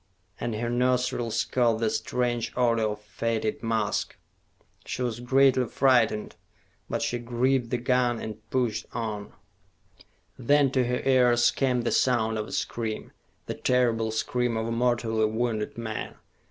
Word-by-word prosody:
And 115 Hz, -, -2 dB
her 120 Hz, +2 st, -2 dB
nostrils 125 Hz, -2 st, +1 dB
caught 120 Hz, -3 st, +1 dB
the 115 Hz, -1 st, +1 dB
strange 120 Hz, -2 st, -1 dB
odor 115 Hz, -2 st, +2 dB
of 105 Hz, 0 st, -3 dB
fetid 110 Hz, +1 st, -2 dB
musk. 115 Hz, -3 st, -1 dB, 0.7 s
She 125 Hz, -, -4 dB
was 120 Hz, -2 st, -2 dB
greatly 130 Hz, 0 st, +3 dB
frightened; 120 Hz, -4 st, +2 dB, 0.5 s
but -, -, -1 dB
she 120 Hz, -, -1 dB
gripped 120 Hz, +1 st, 0 dB
the 125 Hz, -, 0 dB
gun 120 Hz, -1 st, +1 dB
and 110 Hz, 0 st, -8 dB
pushed 120 Hz, -4 st, -1 dB
on. 110 Hz, -3 st, -4 dB, 1.1 s
Then 140 Hz, +2 st, +3 dB
to 130 Hz, -2 st, +2 dB
her 125 Hz, 0 st, -1 dB
ears 125 Hz, -3 st, +4 dB
came 125 Hz, -3 st, +1 dB
the -, -, 0 dB
sound 110 Hz, -3 st, +2 dB
of 105 Hz, -, -4 dB
a -, -, -10 dB
scream, 110 Hz, -2 st, -3 dB, 0.3 s
the -, -, -3 dB
terrible 120 Hz, -3 st, +1 dB
scream 120 Hz, +1 st, -1 dB
of 110 Hz, -, -1 dB
a 115 Hz, -, -3 dB
mortally 115 Hz, -2 st, +1 dB
wounded 110 Hz, -1 st, -2 dB
man. 110 Hz, -2 st, -5 dB
120 Hz, 145 wpm, -27 LUFS, 110-125 Hz, 1.1 s, ears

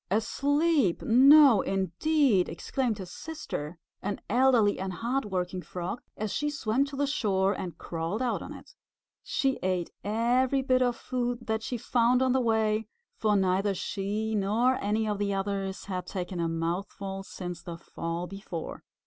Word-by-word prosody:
"Asleep! 280 Hz, -, +2 dB
No 270 Hz, -1 st, +7 dB
indeed!" 195 Hz, -, +2 dB
exclaimed 230 Hz, +7 st, -2 dB
his 185 Hz, -3 st, -8 dB
sister, 175 Hz, -, -6 dB, 0.2 s
an 205 Hz, -, -3 dB
elderly 240 Hz, -4 st, +4 dB
and 190 Hz, 0 st, -3 dB
hard 240 Hz, +6 st, -1 dB
working 185 Hz, -2 st, -2 dB
Frog, 180 Hz, +6 st, -5 dB, 0.2 s
as 215 Hz, -1 st, -3 dB
she 295 Hz, 0 st, 0 dB
swam 270 Hz, -2 st, 0 dB
to 280 Hz, 0 st, -8 dB
the 285 Hz, +1 st, +1 dB
shore 200 Hz, -8 st, +1 dB
and 180 Hz, -3 st, -6 dB
crawled 165 Hz, +5 st, -3 dB
out 250 Hz, -2 st, -1 dB
on -, -, -8 dB
it. -, -, -12 dB, 0.5 s
She 270 Hz, -1 st, 0 dB
ate 185 Hz, -2 st, -1 dB
every 245 Hz, +5 st, +2 dB
bit 255 Hz, -1 st, +3 dB
of 245 Hz, -1 st, +2 dB
food 245 Hz, -1 st, -3 dB
that 220 Hz, 0 st, -1 dB
she 245 Hz, +2 st, -3 dB
found 245 Hz, +2 st, +2 dB
on 260 Hz, -, +2 dB
the 260 Hz, +1 st, +2 dB
way, 220 Hz, -2 st, +1 dB, 0.3 s
for 215 Hz, -1 st, +1 dB
neither 195 Hz, +1 st, +2 dB
she 205 Hz, +4 st, -2 dB
nor 215 Hz, +5 st, +2 dB
any 215 Hz, +2 st, 0 dB
of 205 Hz, -1 st, -1 dB
the 200 Hz, -1 st, 0 dB
others 195 Hz, -1 st, -3 dB
had 185 Hz, -2 st, -4 dB
taken 180 Hz, -2 st, -4 dB
a 170 Hz, -, +1 dB
mouthful 190 Hz, +4 st, -3 dB
since 180 Hz, -3 st, -7 dB
the 170 Hz, -1 st, -7 dB
fall 165 Hz, +1 st, -4 dB
before. 185 Hz, -3 st, -7 dB
210 Hz, 160 wpm, -28 LUFS, 190-250 Hz, 0.5 s, No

